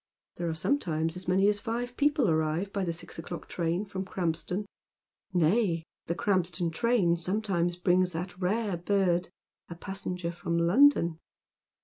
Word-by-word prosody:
There 170 -1 -2
are 160 - -2
sometimes 165 - 0
as 180 0 -7
many 190 +2 +4
as 205 0 +2
five 240 +3 -3
people 290 -3 +3
arrive 160 +4 0
by 200 - 0
the 175 - -1
six 165 0 -7
o'clock 170 +1 -7
train 170 +3 -1
from 190 -1 -4
Kranipston, 180 +1 -2 0.4
— - - -55
nay, 175 0 +2 0.2
the 170 - -1
Krampston 180 -2 0
train 185 -3 +2
sometimes 175 -1 0
brings 180 +1 +2
that 175 +2 -4
rare 200 0 0
bird, 180 -1 +1 0.4
a 170 - -6
passenger 180 -1 -4
from 170 0 -2
London. 170 - +4
180 Hz, 150 wpm, -29 LUFS, 170-200 Hz, 0.4 s, many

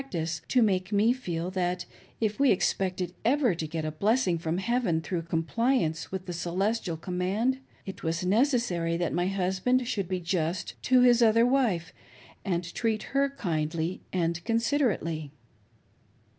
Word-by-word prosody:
ctice 165 -1 -3
to 250 -2 +4
make 185 -2 0
me 215 +4 +4
feel 180 -8 -4
that 180 -1 -1 0.3
if 215 0 -1
we 280 -1 +5
expected 185 -2 0
ever 250 -2 +3
to 160 -2 -4
get 160 0 -4
a 155 - -2
blessing 195 +1 +1
from 160 +1 -2
heaven 195 -5 +1
through 170 +1 -3
compliance 165 +2 0
with 190 -1 -4
the 180 - -5
"celestial" 180 +1 -1
command, 190 +9 -1 0.3
it 190 -1 -7
was 165 +1 -1
neces^ 240 +7 +3
sary 170 -6 -1
that 175 0 -1
my 175 +1 +1
husband 195 +7 +1
should 200 -6 -1
be 185 -1 -1
just 170 0 -2
to 255 -1 +4
his 245 -1 +5
other 230 0 +5
wife 235 -11 +1 0.5
and 175 -2 -2
treat 220 -2 -1
her 275 0 +3
kindly 165 - -2
and 170 -1 -1
considerately. 230 - 0
185 Hz, 155 wpm, -28 LUFS, 170-230 Hz, 0.5 s, we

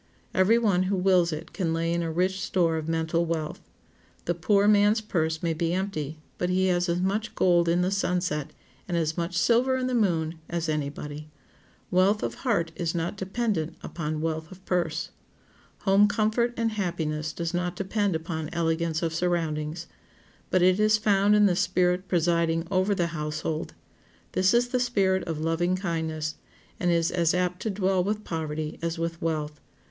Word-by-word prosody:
Every 190 +5 +4
one 205 -6 +2
who 200 - +1
wills 180 -2 +3
it 155 - -6
can 165 -5 -1
lay 165 +1 0
in 170 - 0
a 165 -1 -2
rich 185 +3 0
store 170 -3 +1
of 160 -1 -3
mental 165 +1 0
wealth. 160 -2 -3 0.6
The 175 - +1
poor 200 +4 +2
man's 210 +1 +5
purse 160 -7 -1
may 165 -1 +1
be 165 +1 -1
empty, 160 -6 -3 0.2
but 180 - 0
he 185 +1 +2
has 175 0 +1
as 170 +1 +1
much 205 +4 -1
gold 175 -2 +3
in 175 +1 +2
the 185 - 0
sunset, 180 -6 -1 0.4
and 175 -2 -1
as 160 -1 0
much 175 0 -2
silver 250 +5 +3
in 255 - -1
the 255 - -1
moon, 165 -8 +1
as 170 -1 -2
any 150 -2 -1
body. 150 +1 -8 0.6
Wealth 190 +3 +3
of - - -2
heart 195 -10 0
is 170 -1 -2
not 170 +3 -2
dependent 195 -4 -2
upon 155 -2 -4
wealth 160 0 -2
of 185 0 -13
purse. 170 -2 -1 0.7
Home 200 +1 +5
comfort 220 +3 +1
and 230 -1 +1
happiness 160 -6 -2
does 170 +2 -4
not 180 0 -1
depend 195 0 0
upon 160 -1 -4
elegance 165 -1 0
of 165 -1 -1
surroundings. 165 -1 -1 0.6
But 185 -1 +3
it 185 +2 +4
is 215 0 +4
found 205 -1 +3
in 210 0 +5
the 185 -3 +3
spirit 180 +1 +1
presiding 170 -1 +1
over 190 +2 +2
the 175 - +1
household; 155 +1 -3 0.6
this 185 0 +3
is 240 +1 +3
the 250 - 0
spirit 195 -6 +1
of 165 -2 -3
loving 165 +3 +1
kindness, 160 -4 -3 0.4
and 180 - +1
is 170 -1 +2
as 170 -1 +2
apt 180 0 -1
to 220 - -1
dwell 190 -2 +1
with 210 +2 -2
poverty 155 -3 -4
as 170 0 -2
with 165 0 -3
wealth. 150 -2 -2
175 Hz, 180 wpm, -26 LUFS, 160-195 Hz, 0.7 s, man's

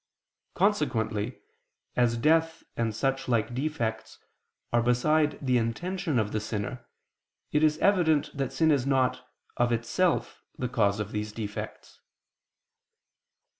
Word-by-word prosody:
Consequently, 125 - 0 0.6
as 120 -1 +2
death 160 +5 +2
and 115 -2 -1
such 135 +3 -1
like 120 -1 +1
defects 115 -6 -3 0.6
are 120 - +4
beside 150 +5 +2
the 125 -1 +3
intention 170 - -2
of 105 -2 0
the 110 - 0
sinner, 110 +3 -5 0.6
it 150 - +2
is 155 -1 +3
evident 160 -6 +2
that 135 -2 -2
sin 160 +4 +3
is 140 -3 +1
not, 130 -2 +1 0.3
of 120 0 +2
itself, 120 +10 0 0.2
the 125 - -2
cause 105 -4 +1
of 105 0 -3
these 105 0 -3
defects. 105 -1 -7
125 Hz, 125 wpm, -28 LUFS, 115-150 Hz, 0.6 s, are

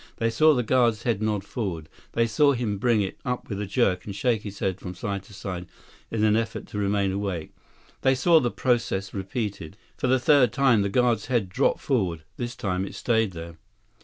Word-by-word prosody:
They 115 0 0
saw 155 +6 +5
the 125 - +1
guard's 120 -2 +2
head 115 -4 0
nod 105 -2 0
forward. 95 - -4 0.3
They 115 - +2
saw 140 +6 +3
him 110 -5 -2
bring 115 -2 +3
it 95 - -6
up 125 -1 -3
with 100 -2 -3
a 105 - -3
jerk 95 -5 +1
and 100 -1 -7
shake 110 +1 +1
his 100 -2 -8
head 95 -1 -2
from 90 -1 -7
side 100 +2 -3
to 105 - -15
side 90 -2 -5 0.4
in 110 -1 -1
an 105 -1 +4
effort 115 0 -2
to 105 - -4
remain 100 -1 +1
awake. 95 -4 -3 0.5
They 130 0 +3
saw 165 +5 +5
the 125 -5 0
process 115 -7 -1
repeated. 100 -2 -4 0.2
For - - -1
the 130 +1 +4
third 130 -3 +4
time, 130 -5 +4
the 100 - 0
guard's 120 0 +1
head 120 -7 0
dropped 130 +9 +1
forward. 95 - 0
This 120 0 -4
time, 95 -6 -2
it 95 - -7
stayed 110 -5 +1
there. 85 0 -8
105 Hz, 210 wpm, -25 LUFS, 95-120 Hz, 0.5 s, saw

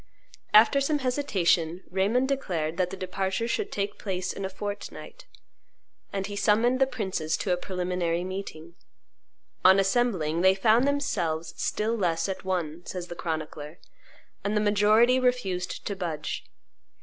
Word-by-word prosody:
After 230 +6 +6
some 295 +2 +1
hesitation, 190 - +1
Raymond 210 +8 +2
declared 175 - -2
that 180 -1 +1
the 195 - -7
departure 190 +4 -2
should 410 - -2
take 200 0 -3
place 185 -2 -3
in 195 - -6
a 190 - -2
fortnight, 205 - -7 0.8
and 195 -1 -2
he 205 +1 -6
summoned 225 +5 +3
the 265 - +4
princes 190 -10 -2
to 185 - 0
a - - +3
preliminary 180 -2 -2
meeting. 185 -3 -7 0.9
On 190 +1 +7
assembling 195 -6 +1
"they 190 +1 +5
found 225 +6 +4
themselves 185 - -1
still 220 +2 -1
less 170 -5 0
at 190 - -4
one," 175 -3 -2
says 180 -1 -6
the 175 - -6
chronicler, 155 -1 -5 0.7
and 205 +1 0
the - - +2
majority 215 +4 +4
refused 225 -8 -1
to 200 - -2
budge. 165 -5 -4
190 Hz, 145 wpm, -27 LUFS, 175-225 Hz, 0.9 s, On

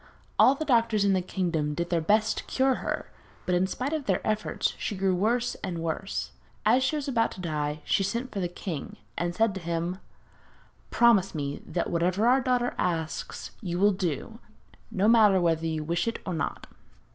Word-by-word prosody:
All 270 - +7
the 315 - -4
doctors 230 -6 +3
in 200 - +4
the 185 - +2
kingdom 165 -5 -1
did 170 +3 -3
their 170 -2 +2
best 215 +6 +2
to - - -7
cure 265 0 +2
her, - - -3 0.3
but 180 - 0
in 180 +1 +2
spite 255 +9 -3
of 305 -3 -3
their 190 -3 +2
efforts 215 0 0
she 205 - -3
grew 190 0 +2
worse 235 +6 +1
and 185 -4 -3
worse. 165 +4 -3 0.3
As 240 +5 +5
she 260 +4 +1
was 290 -2 -3
about 230 -4 +2
to - - -12
die, 150 -3 -2
she - - +2
sent 235 +6 -2
for 200 - -4
the 180 - 0
king 170 -3 -6 0.2
and 175 0 -2
said 225 0 +2
to 190 - -6
him: 170 +2 -2 0.9
'Promise 215 -7 +4
me 140 -1 -3
that 175 - -2
whatever 180 +5 +1
our 260 +2 +5
daughter 245 -1 +1
asks, 160 -4 -2
you 175 -5 -3
will 205 +2 +4
do, 185 - -3 0.5
no 210 -2 +1
matter 215 -4 +6
whether 165 -2 +1
you 160 -1 -2
wish 170 +3 -1
to 230 - -1
or 185 - -2
not.' 160 - -3
190 Hz, 195 wpm, -27 LUFS, 170-230 Hz, 0.9 s, All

